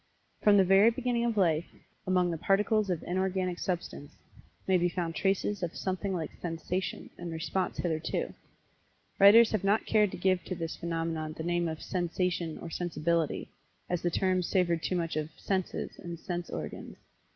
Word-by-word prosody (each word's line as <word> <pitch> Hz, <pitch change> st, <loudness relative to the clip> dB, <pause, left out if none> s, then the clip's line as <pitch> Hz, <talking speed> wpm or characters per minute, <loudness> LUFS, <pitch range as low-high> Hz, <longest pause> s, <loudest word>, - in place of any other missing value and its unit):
From 205 Hz, -1 st, +6 dB
the 195 Hz, -, +7 dB
very 195 Hz, +4 st, +6 dB
beginning 235 Hz, 0 st, 0 dB
of 230 Hz, -2 st, 0 dB
Life 170 Hz, -4 st, +2 dB, 0.4 s
among 180 Hz, -1 st, +2 dB
the 165 Hz, -, -2 dB
Particles 210 Hz, +2 st, +2 dB
of 175 Hz, -3 st, -1 dB
Inorganic 185 Hz, -1 st, -1 dB
Substance, 165 Hz, -5 st, -4 dB, 0.5 s
may 190 Hz, -, +3 dB
be 175 Hz, 0 st, +3 dB
found 170 Hz, -1 st, -2 dB
traces 195 Hz, +1 st, 0 dB
of 175 Hz, -2 st, -3 dB
something 190 Hz, +1 st, -2 dB
like 170 Hz, -4 st, -3 dB
Sensation, 170 Hz, +1 st, -3 dB
and 175 Hz, -1 st, -5 dB
response 165 Hz, +3 st, -2 dB
thereto. 160 Hz, -2 st, -1 dB, 0.9 s
Writers 220 Hz, +3 st, +8 dB
have 215 Hz, -3 st, 0 dB
not 205 Hz, +3 st, +2 dB
cared 210 Hz, -2 st, +3 dB
to -, -, -7 dB
give 185 Hz, 0 st, +2 dB
to 185 Hz, -, -3 dB
this 165 Hz, -1 st, -4 dB
phenomenon 165 Hz, -2 st, -3 dB
the 160 Hz, -, -6 dB
name 175 Hz, 0 st, 0 dB
of 160 Hz, -1 st, -5 dB
"sensation," 175 Hz, -2 st, -1 dB
or 170 Hz, -, -8 dB
"sensibility," 170 Hz, -2 st, -1 dB, 0.4 s
as 175 Hz, -1 st, 0 dB
the 175 Hz, -, +1 dB
terms 185 Hz, 0 st, +1 dB
savored 170 Hz, -4 st, +1 dB
too 185 Hz, -, -1 dB
much 165 Hz, -3 st, -1 dB
of 155 Hz, 0 st, -2 dB
"senses," 190 Hz, -2 st, -3 dB
and 170 Hz, -1 st, -6 dB
"sense 175 Hz, 0 st, -4 dB
organs." -, -, -6 dB
180 Hz, 170 wpm, -30 LUFS, 165-190 Hz, 0.9 s, Writers